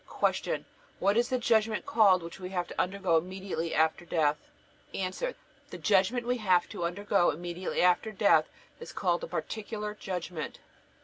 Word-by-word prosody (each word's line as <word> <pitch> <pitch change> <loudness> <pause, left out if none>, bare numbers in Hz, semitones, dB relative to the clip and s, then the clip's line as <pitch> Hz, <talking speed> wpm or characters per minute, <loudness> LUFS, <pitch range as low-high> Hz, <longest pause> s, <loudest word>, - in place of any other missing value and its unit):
Q. - - -1 0.3
What 200 +1 +2
is 240 +1 +2
the 255 - +1
judgment 225 -3 +1
called 195 -6 +4
which 170 +3 -9
we 180 -1 -6
have 180 -2 -2
to - - -1
undergo 185 -3 +1
immediately 185 -1 -3
after 160 +2 +2
death? 155 -3 +1 0.6
A. 185 -1 -1 0.6
The - - -7
judgment 215 +4 +2
we 250 +1 0
have 185 -6 +3
to 175 - -4
undergo 195 +1 +2
immediately 175 +4 -2
after 180 +5 +3
death 205 0 +3 0.3
is 475 - -9
called - - 0
the - - -5
Particular 210 - -4
Judgment. 180 -6 -5
190 Hz, 160 wpm, -29 LUFS, 175-215 Hz, 0.6 s, called